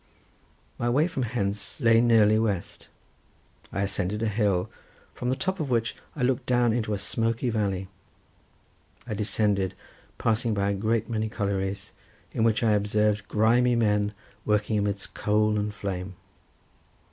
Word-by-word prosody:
My 120 - 0
way 140 +6 +3
from 150 -7 -3
hence 105 -3 -3
lay 115 -3 +5
nearly 110 -2 +5
west. 100 -6 -2 0.8
I 100 - -1
ascended 100 +2 -1
a - - +2
hill, 100 -4 +1 0.5
from 125 - -3
the 130 - +1
top 190 +7 -2
of 150 -4 -2
which 115 -2 0 0.2
I 140 - -2
looked 125 0 0
down 120 -2 +3
into 110 -3 -1
a - - -3
smoky 115 +4 -1
valley. 100 -4 -1 1.2
I 115 - -4
descended, 100 -2 0 0.4
passing 115 0 +1
by 100 0 +1
a - - 0
great 110 +2 0
many 110 -1 -1
collieries, 100 -2 -2 0.4
in 110 - 0
which 115 0 +2
I 110 - +4
observed 105 0 +1
grimy 120 +3 +3
men 105 -2 +1 0.3
working 105 0 +1
amidst 100 -1 -3
smoke 105 0 +2
and 105 0 -1
flame. 95 -2 -5
105 Hz, 145 wpm, -26 LUFS, 100-115 Hz, 1.2 s, lay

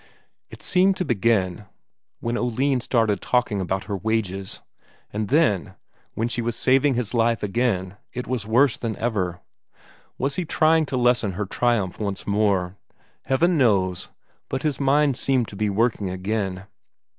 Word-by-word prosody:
It - - -13
seemed 190 0 +3
to 180 - -1
begin 105 - +1 0.6
when 120 0 -2
Oline 125 +2 0
started 115 -5 +1
talking 120 -5 0
about 95 +1 -2
her 100 +1 -4
wages; 100 -2 -2 0.5
and 105 0 -2
then, 105 - +2 0.4
when 115 - 0
she 120 0 -2
was 115 0 -2
saving 135 +2 +3
his 120 -3 -2
life 115 -2 +1
again, 100 -3 -1
it 125 0 -5
was 120 -5 -3
worse 125 +3 +3
than 115 -3 -3
ever. 95 -7 -2 0.8
Was 140 +1 -2
he 180 - 0
trying 160 -1 +2
to 135 - -2
lessen 120 -5 +2
her 105 +3 -3
triumph 105 -3 0
once 100 -2 -3
more? 100 -3 +1 0.5
Heaven 160 +6 +2
knows 95 -7 +1 0.4
but 130 - -3
his 150 -4 -1
mind 140 -1 +3
seemed 130 -4 +1
to - - -10
be 105 +1 0
working 105 -1 0
again. 95 0 -3
115 Hz, 155 wpm, -23 LUFS, 100-130 Hz, 0.8 s, seemed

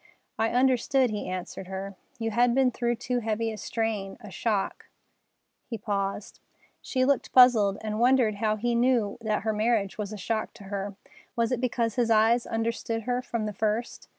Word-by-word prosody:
"I 225 0 +2
understood," 255 0 +2
he 210 -3 -4
answered 185 0 -5
her. 190 +1 -5 0.2
"You 225 -1 -2
had 240 +2 +3
been 265 -1 +4
through 240 0 -1
too 245 +2 -2
heavy 225 0 -1
a 215 - -7
strain, 215 -4 -3
a 210 -5 -11
shock——" 205 -1 -2 0.8
He 230 - -4
paused. 200 -1 -3 0.4
She 255 -1 0
looked 275 -1 +1
puzzled, 225 -6 +6
and 215 0 -3
wondered 245 -4 +3
how 215 0 +1
he 240 +3 -1
knew 235 -3 +2
that 215 -2 -1
her 220 0 0
marriage 215 -2 0
was 205 -1 -3
a 215 - -6
shock 215 +3 -3
to 210 - -12
her. 200 0 -4 0.4
Was 230 0 +1
it 250 -1 -1
because 235 -2 -1
his 240 -2 +2
eyes 225 +2 +4
understood 225 0 -2
her 245 +2 -1
from 235 -3 -3
the 210 - -3
first? 220 +3 -2
225 Hz, 180 wpm, -27 LUFS, 210-240 Hz, 0.8 s, puzzled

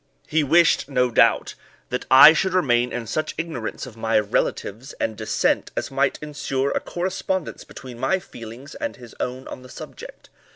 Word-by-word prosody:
He 160 0 +2
wished, 165 0 +4
no 125 -2 +1
doubt, - - +3 0.4
that 125 - -3
I 135 +4 +10
should 185 +3 0
remain 125 -8 +2
in 120 -1 -4
such 155 +7 -3
ignorance 160 -9 -4
of 125 -4 -11
my 115 0 +1
relatives 105 +3 -1
and 110 - -3
descent 110 0 0
as - - -2
might 135 0 +1
insure 140 -2 -2
a - - 0
correspondence 185 0 -3
between 125 -2 -11
my 190 - +2
feelings 120 -5 -11
and 290 -1 -4
his 120 -3 -13
own 130 +1 -4
on - - -8
this 130 -1 -13
subject. - - -11
130 Hz, 170 wpm, -23 LUFS, 120-155 Hz, 0.4 s, I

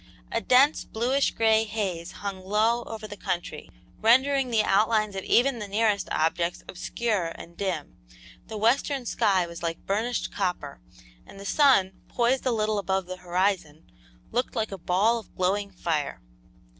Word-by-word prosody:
A 230 - 0
dense, 270 +6 +4
bluish 255 +5 0
gray 220 -1 +3
haze 195 -6 -3
hung 195 -2 -4
low 220 +5 +1
over 220 -1 -7
the 205 - -8
country, 175 -6 -4 0.3
rendering 265 +3 +4
the 225 -3 +2
outlines 215 0 +2
of 190 - -4
even 250 0 +3
the 210 - -5
nearest 210 0 +1
objects 170 +2 0
obscure 205 0 -2
and 170 - -11
dim; 180 -7 -4 0.5
the 220 - -6
western 250 +4 +1
sky 190 -5 +2
was 170 0 -9
like 165 -1 -4
burnished 225 +5 -1
copper, 175 - -3 0.5
and 195 - -13
the 200 - -9
sun, 200 -8 +3
poised 250 +2 +1
a - - +3
little 215 -2 0
above 190 -1 -1
the 185 +1 -7
horizon, 180 -3 -1 0.4
looked 245 +3 -1
like 220 -2 -1
a 195 - -5
ball 205 +7 +2
of 220 - -16
glowing 200 +2 0
fire. 165 -6 -2
205 Hz, 155 wpm, -26 LUFS, 185-230 Hz, 0.5 s, dense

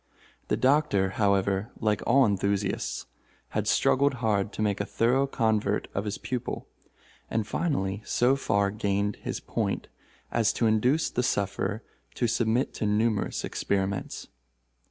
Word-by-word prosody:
The - - +1
Doctor, 130 -9 +3
however, 100 +1 +2
like 105 -2 +1
all 135 +2 +6
enthusiasts, 100 -1 -1 0.4
had - - -2
struggled 140 0 +3
hard 105 -4 0
to - - -4
make 100 -1 0
a - - -2
thorough 130 +4 +2
convert 110 -5 0
of 100 - -2
his 105 0 -3
pupil, 120 +1 -4 0.6
and 110 -2 0
finally 100 - -1
so 125 +5 +2
far 100 -7 +1
gained 100 0 -1
his - - -4
point - - -2 0.4
as 115 -3 +2
to 115 - 0
induce 125 +8 +2
the 125 - 0
sufferer 100 -1 -1 0.3
to 125 - 0
submit 115 +3 +1
to 105 - -2
numerous 105 0 0
experiments. 100 -1 -2
110 Hz, 135 wpm, -27 LUFS, 100-120 Hz, 0.6 s, all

